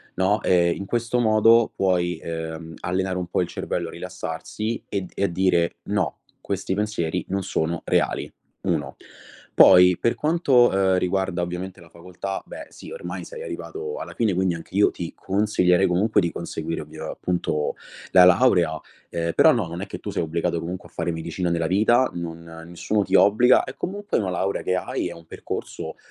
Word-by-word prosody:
no, 95 Hz, +3 st, +2 dB
ehm, 85 Hz, -2 st, +3 dB
in 100 Hz, -, -6 dB
questo 120 Hz, +2 st, -1 dB
modo 115 Hz, 0 st, +5 dB
puoi, 90 Hz, -3 st, +1 dB
ehm, 80 Hz, 0 st, -6 dB
allenare 95 Hz, +1 st, -1 dB
un 90 Hz, -1 st, -3 dB
po' 90 Hz, -, 0 dB
il 90 Hz, -, -1 dB
cervello 85 Hz, 0 st, -3 dB
a -, -, -9 dB
rilassarsi 90 Hz, +5 st, -5 dB
e 100 Hz, -, -1 dB
d 90 Hz, -, -10 dB
e 100 Hz, -, -1 dB
a -, -, +4 dB
dire: 85 Hz, -1 st, +1 dB
“No, 100 Hz, -7 st, -1 dB, 0.2 s
questi 95 Hz, -1 st, -3 dB
pensieri 95 Hz, -5 st, -2 dB
non 95 Hz, 0 st, -1 dB
sono 85 Hz, -2 st, -2 dB
reali”. -, -, 0 dB, 0.3 s
1, -, -, -2 dB, 0.6 s
poi 90 Hz, -1 st, +7 dB
per 115 Hz, -, +1 dB
quanto, 150 Hz, -6 st, +3 dB
ehm, 95 Hz, -1 st, +3 dB
riguarda 95 Hz, -1 st, -1 dB
ovviamente 90 Hz, +1 st, -5 dB
la 85 Hz, -, -15 dB
facoltà, 90 Hz, +3 st, -6 dB
beh -, -, -9 dB
sì, -, -, -12 dB
ormai 485 Hz, -, -6 dB
sei 480 Hz, -1 st, -9 dB
arrivato 445 Hz, -1 st, -6 dB
alla -, -, -7 dB
fine 110 Hz, -4 st, +1 dB
quindi 95 Hz, -1 st, +1 dB
anche 85 Hz, +3 st, -8 dB
io 105 Hz, -, +4 dB
ti 85 Hz, -, -6 dB
consiglierei 95 Hz, -2 st, +2 dB
comunque 100 Hz, +5 st, +2 dB
di 85 Hz, -, -1 dB
conseguire, 85 Hz, -1 st, -4 dB
ovvia -, -, -8 dB
appunto 85 Hz, -4 st, -2 dB, 0.4 s
la 90 Hz, -, +8 dB
laurea, 90 Hz, -5 st, +4 dB, 0.3 s
ehm, 85 Hz, -1 st, -2 dB
però -, -, +6 dB
no, -, -, 0 dB
non 85 Hz, +2 st, -6 dB
è -, -, -4 dB
che -, -, -7 dB
tu -, -, -5 dB
sei -, -, -1 dB
obbligato 85 Hz, +1 st, -1 dB
comunque 90 Hz, +2 st, -6 dB
a -, -, -28 dB
fare 85 Hz, -, -2 dB
medicina 85 Hz, +2 st, -3 dB
nella 85 Hz, -1 st, 0 dB
vita, 110 Hz, +7 st, +3 dB
non 85 Hz, -1 st, -6 dB, 0.3 s
nessuno 100 Hz, +4 st, -1 dB
ti -, -, +3 dB
obbliga. 120 Hz, +5 st, +5 dB
È 125 Hz, -, -8 dB
comunque 205 Hz, +3 st, -3 dB
una 95 Hz, -3 st, -1 dB
laurea 95 Hz, +2 st, -1 dB
che 90 Hz, -, 0 dB
hai, 90 Hz, -, -2 dB
è -, -, -7 dB
un 85 Hz, -1 st, -15 dB
percorso, -, -, -6 dB
90 Hz, 185 wpm, -23 LUFS, 85-105 Hz, 0.6 s, la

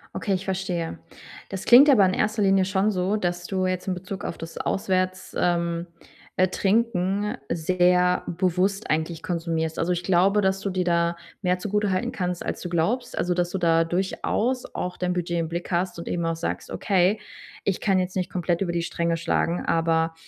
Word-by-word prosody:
Okay, 200 Hz, -, -1 dB
ich 190 Hz, 0 st, -2 dB
verstehe. 185 Hz, -3 st, -2 dB, 0.5 s
Das 195 Hz, -1 st, -5 dB
klingt 265 Hz, +5 st, +8 dB
aber 210 Hz, -9 st, +6 dB
in 185 Hz, -, +1 dB
erster 215 Hz, +2 st, 0 dB
Linie 195 Hz, -1 st, +4 dB
schon 190 Hz, +2 st, +1 dB
so, 195 Hz, +1 st, 0 dB
dass 175 Hz, -2 st, -2 dB
du 185 Hz, -1 st, -1 dB
jetzt 185 Hz, +1 st, -2 dB
im 185 Hz, -, +1 dB
Bezug 185 Hz, +2 st, -7 dB
auf -, -, -4 dB
das 165 Hz, 0 st, -8 dB
Auswärts 185 Hz, -1 st, -1 dB
ähm, 170 Hz, -1 st, 0 dB, 0.5 s
äh, 185 Hz, -, +4 dB
Trinken 205 Hz, -1 st, 0 dB
sehr 180 Hz, +2 st, +2 dB
bewusst 185 Hz, +3 st, 0 dB
eigentlich 160 Hz, +1 st, -1 dB
konsumierst. 165 Hz, -2 st, -2 dB
Also, 175 Hz, +2 st, +1 dB
ich 175 Hz, -, -3 dB
glaube, 190 Hz, +3 st, +3 dB
dass 190 Hz, 0 st, +1 dB
du 200 Hz, -, -2 dB
dir 185 Hz, -1 st, 0 dB
da 170 Hz, -1 st, +1 dB, 0.3 s
mehr 180 Hz, -1 st, +1 dB
zugutehalten 205 Hz, -1 st, 0 dB
kannst 180 Hz, -2 st, -3 dB
als -, -, -3 dB
du 180 Hz, -, -4 dB
glaubst, 210 Hz, +9 st, -1 dB
also, 180 Hz, -, +1 dB
dass 175 Hz, 0 st, 0 dB
du 190 Hz, -, -2 dB
da 165 Hz, -2 st, +3 dB
durchaus 210 Hz, +7 st, -1 dB
auch 180 Hz, -, -4 dB
dein 180 Hz, 0 st, -1 dB
Budget 175 Hz, -1 st, -2 dB
im 165 Hz, -, -1 dB
Blick 170 Hz, +2 st, -5 dB
hast 175 Hz, 0 st, 0 dB
und 170 Hz, -, -6 dB
eben 170 Hz, -1 st, -1 dB
auch 165 Hz, 0 st, 0 dB
sagst: 165 Hz, -, -4 dB
„Okay, 195 Hz, +1 st, +2 dB, 0.4 s
ich 195 Hz, -, 0 dB
kann 195 Hz, -2 st, +2 dB
jetzt 185 Hz, +1 st, -2 dB
nicht 185 Hz, -1 st, -1 dB
komplett 175 Hz, -1 st, -1 dB
über 175 Hz, -3 st, -1 dB
die 170 Hz, -, 0 dB
Stränge 170 Hz, 0 st, -1 dB
schlagen“, 170 Hz, +1 st, 0 dB
aber 165 Hz, 0 st, +1 dB
180 Hz, 190 wpm, -25 LUFS, 170-195 Hz, 0.5 s, klingt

